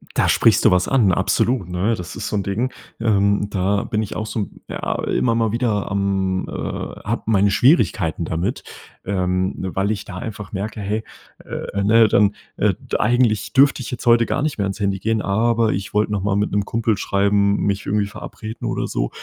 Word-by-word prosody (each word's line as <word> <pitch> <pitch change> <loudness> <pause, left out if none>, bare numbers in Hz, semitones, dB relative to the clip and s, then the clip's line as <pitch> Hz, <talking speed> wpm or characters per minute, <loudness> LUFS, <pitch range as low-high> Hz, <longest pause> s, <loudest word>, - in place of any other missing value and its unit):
Da - - +2
sprichst - - +4
du - - +7
was 90 0 +2
an, 115 -8 +3
absolut, 95 +3 +1
ne? 95 +6 0
Das 90 -3 -8
ist - - -4
so - - -2
'n 100 - 0
Ding, 115 +6 -1 0.3
ähm, 100 -2 +2
da 100 +1 0
bin 110 +1 -1
ich 100 - -6
auch 110 0 -3
so, 105 -3 -2 0.2
ja, - - -3
immer 115 -2 +1
mal 115 -2 +1
wieder, 115 -4 -1
am 95 -1 0
äh, - - -8
habe - - -4
meine 100 -2 +3
Schwierigkeiten 100 - +2
damit. 90 - -2 0.4
Ähm, 95 -1 0
weil 95 +2 -2
ich 110 - -2
da 90 - -8
einfach 105 0 -7
merke: 105 +2 -4
„Hey, 105 +2 -2 0.4
äh, 100 - -4
ne, 110 +2 +5
dann, 105 0 +3 0.2
äh, - - +2
d - - -3
eigentlich 110 -3 +2
dürfte 140 0 +4
ich - - -6
jetzt 125 - -6
heute 115 0 +5
gar 145 - -1
nicht 150 -8 -2
mehr 100 - +1
ans 100 +2 -4
Handy 100 -1 0
gehen, 110 +2 0
aber 115 +2 +2
ich 100 +2 -5
wollte 105 0 +2
noch 100 -2 -1
mal 100 0 0
mit 105 +1 0
'nem 100 0 +1
Kumpel 115 0 0
schreiben, 100 +1 +2
mich 100 0 -1
irgendwie 105 0 +1
verabreden“ 110 +2 -8
oder - - -1
so. - - -2
105 Hz, 205 wpm, -21 LUFS, 100-110 Hz, 0.4 s, du